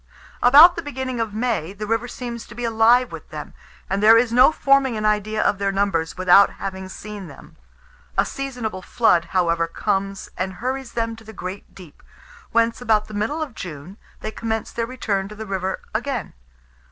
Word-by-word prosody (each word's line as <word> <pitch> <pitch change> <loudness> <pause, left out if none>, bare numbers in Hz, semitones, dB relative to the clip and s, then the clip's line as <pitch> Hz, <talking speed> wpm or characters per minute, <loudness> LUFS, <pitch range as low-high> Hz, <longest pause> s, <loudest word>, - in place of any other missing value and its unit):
About 300 +8 +8
the 335 - -3
beginning 260 -4 -4
of 225 -2 -1
May, 220 -7 -1
the 210 +1 -6
river 225 +3 -1
seems 240 -2 -7
to 210 - -12
be 240 - -6
alive 230 +2 +4
with - - -9
them, - - -8 0.3
and 195 +1 -1
there 220 +2 +8
is 230 0 +2
no 250 +5 +7
forming 275 -5 +2
an 215 - -2
idea 215 0 +1
of 200 - +1
their 200 -1 0
numbers 195 -5 -1
without 185 +2 +6
having 190 -1 -6
seen 205 -1 -8
them. - - -14 0.6
A - - +4
seasonable 245 -8 -5
flood, 185 -4 +2
however, 170 -3 +1
comes, 195 +3 -2
and 190 +1 -3
hurries 255 +5 -4
them 230 -1 -2
to 225 - -14
the 220 0 -11
"great 185 +1 -8
deep;" 180 -6 -14 0.5
whence, 230 0 +1
about 215 -3 +1
the - - -9
middle 225 +10 -1
of 285 -6 -8
June, 170 0 -8 0.2
they 215 - -4
commence 225 -1 -3
their 230 -1 -3
return 210 -6 -2
to 210 - -10
the 220 +1 -7
river 190 -1 -3
again. 245 +1 -3
220 Hz, 190 wpm, -22 LUFS, 195-240 Hz, 0.6 s, About